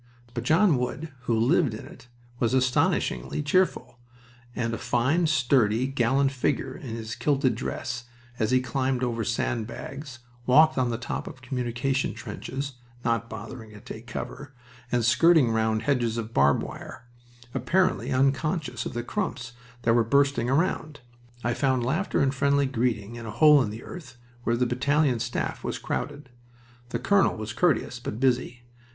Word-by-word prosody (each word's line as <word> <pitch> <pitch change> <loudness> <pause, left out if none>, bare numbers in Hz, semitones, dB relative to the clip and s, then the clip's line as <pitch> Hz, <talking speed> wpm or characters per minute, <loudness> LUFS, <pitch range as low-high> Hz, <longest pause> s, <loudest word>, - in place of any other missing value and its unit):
But 120 -1 -4
John 160 +1 +4
Wood, 140 +4 -4
who 115 -2 +1
lived 130 +1 +3
in 110 - -9
it, - - -14 0.3
was 120 +1 +2
astoundingly 130 - +1
cheerful, 160 -5 +1 0.6
and 115 -1 -1
a - - -3
fine, 145 +8 +1
sturdy, 125 -5 +3
gallant 135 +1 +2
figure, 130 0 -1
in 120 -5 -6
his 110 -1 -5
kilted 140 -4 +1
dress, 120 0 -4 0.3
as 110 - +1
he 130 0 +3
climbed 130 +1 -1
over 115 -2 -1
sand 115 0 -1
bags, 135 +1 -8 0.3
walked 155 +5 +6
on 125 -2 +1
the 115 - -1
top 120 - -4
of 130 - -10
communication 125 +1 -1
trenches 135 -1 -6 0.3
(not 115 0 0
bothering 110 0 -8
to 105 - -11
take 110 +2 -10
cover) 135 +4 -7 0.4
and 120 -2 +2
skirting 155 0 +5
round 110 0 +1
hedges 120 -4 +1
of 115 0 -4
barbed 70 +1 +4
wire, 120 - -9 0.5
apparently 180 +9 +1
unconscious 135 0 0
of - - -7
the 120 0 -3
"crumps" 120 - -3 0.3
that 115 - +4
were 120 0 +4
bursting 140 0 +2
around. 155 0 0 0.4
I 120 - +1
found 130 -3 +1
laughter 160 +10 0
and 135 -1 +2
friendly 140 +1 +2
greeting 115 -4 -1
in 115 -1 -7
a - - -4
hole 145 +6 +6
in 115 - -1
the 110 +3 -8
earth 130 -9 -10 0.3
where 115 0 +2
the 125 - +2
battalion 135 +1 +2
staff - - -3
was - - -2
crowded. 145 -2 -4 0.6
The 115 - -1
colonel 195 - +3
was 110 0 -5
courteous, 155 -7 +1
but 115 -2 -5
busy. 125 -2 0
125 Hz, 160 wpm, -26 LUFS, 115-140 Hz, 0.6 s, walked